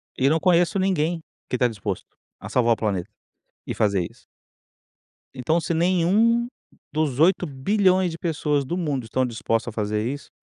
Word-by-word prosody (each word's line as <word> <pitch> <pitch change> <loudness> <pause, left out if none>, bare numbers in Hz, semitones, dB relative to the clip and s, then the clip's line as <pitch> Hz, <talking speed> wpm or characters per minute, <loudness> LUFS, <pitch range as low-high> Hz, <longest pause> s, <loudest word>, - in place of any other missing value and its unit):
E 135 +1 +2
não 160 +2 +2
conheço 175 +1 +3
ninguém 175 -3 0 0.3
que 125 - 0
tá 125 0 +3
disposto 100 -4 -5 0.2
a - - -8
salvar 120 -2 +3
o - - -3
planeta 100 -5 -2 0.6
e - - -3
fazer 100 -5 +1
isso. - - -23 1.1
Então 135 +6 0
se 170 +1 -2
nenhum 185 +8 +3 0.5
dos 150 -4 0
8.000.000.000 185 +3 +2
de 165 - -7
pessoas 150 -4 0
do 175 +6 -3
mundo 145 -8 -1
estão 130 +3 0
dispostas 115 -1 -2
a - - -20
fazer 105 +1 -1
isso 140 +3 -5
150 Hz, 160 wpm, -24 LUFS, 120-175 Hz, 1.1 s, conheço